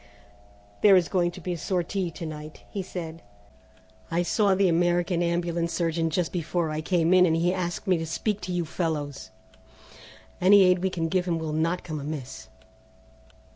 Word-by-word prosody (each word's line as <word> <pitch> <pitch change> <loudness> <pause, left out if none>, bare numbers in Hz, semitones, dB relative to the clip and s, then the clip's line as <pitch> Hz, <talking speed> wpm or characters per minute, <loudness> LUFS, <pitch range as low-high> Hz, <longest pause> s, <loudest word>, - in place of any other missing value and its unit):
"There 200 -2 +7
is 180 -2 +3
going 175 -2 +1
to 175 - -10
be 180 +1 -3
a - - -4
sortie 185 +1 -1
to 165 +1 -7
night," 155 -1 -8
he 200 - -3
said. 170 -3 -7 0.9
"I 170 +1 +1
saw 200 +2 +2
the 195 0 +3
American 175 +1 +1
Ambulance 170 0 -1
surgeon 165 -1 0
just 170 +1 -1
before 170 -1 -1
I 155 0 -2
came 170 +1 +2
in 180 -1 +6
and 160 - +2
he 175 +2 +1
asked 175 -2 -3
me 185 -3 +2
to 165 - -4
speak 210 +5 -2
to 180 - -5
you 175 -1 -1
fellows. 150 -4 -3 1.1
Any 195 +2 +7
aid 180 -1 +4
we 190 +1 0
can 165 -3 -2
give 180 +1 0
him 170 -2 0
will 160 -1 -4
not 165 +3 0
come 155 -3 -5
amiss." 140 - -6
175 Hz, 180 wpm, -26 LUFS, 160-180 Hz, 1.1 s, There